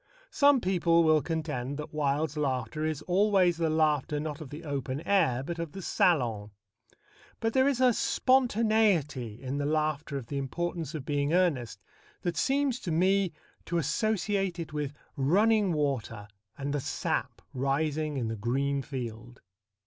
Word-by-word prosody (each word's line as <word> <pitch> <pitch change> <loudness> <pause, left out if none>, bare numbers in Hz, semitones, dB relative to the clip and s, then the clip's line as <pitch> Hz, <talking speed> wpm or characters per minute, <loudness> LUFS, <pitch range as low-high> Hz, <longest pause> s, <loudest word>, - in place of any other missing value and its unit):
Some 285 -3 +4
people 170 -3 +3
will 155 -1 +4
contend 140 -4 -3
that 150 +1 -7
Wilde's 150 0 0
laughter 145 +1 -2
is 155 -1 -2
always 185 -2 +3
the 165 -1 +1
laughter 150 -1 +1
not 150 0 -5
of 150 - -8
the 150 +4 -8
open 140 -3 -3
air 160 -12 +2
but 170 +4 -5
of 165 -3 -4
the 195 - -7
salon. 120 - +1 0.9
But 225 0 -1
there 260 0 +4
is 275 -3 +1
a 255 -2 +5
spontaneity 215 - +2
in 135 +2 -4
the 145 - -1
laughter 150 -1 -1
of 130 - -6
The 140 +4 -3
Importance 165 +3 -3
of 140 -4 -5
Being 145 +1 0
Earnest 150 - 0 0.4
that 175 -1 -1
seems 270 - +1
to 175 - -4
me 190 +3 +2 0.3
to 170 - -1
associate 195 0 0
it 165 -3 -6
with 150 -1 -3 0.2
running 200 +8 +3
water 140 -9 -2 0.3
and 140 0 -3
the 145 - -1
sap - - -2
rising 145 +3 -1
in 120 -3 -1
the 115 - -3
green 135 +6 -1
field. 120 -3 -7
155 Hz, 155 wpm, -29 LUFS, 140-180 Hz, 0.9 s, a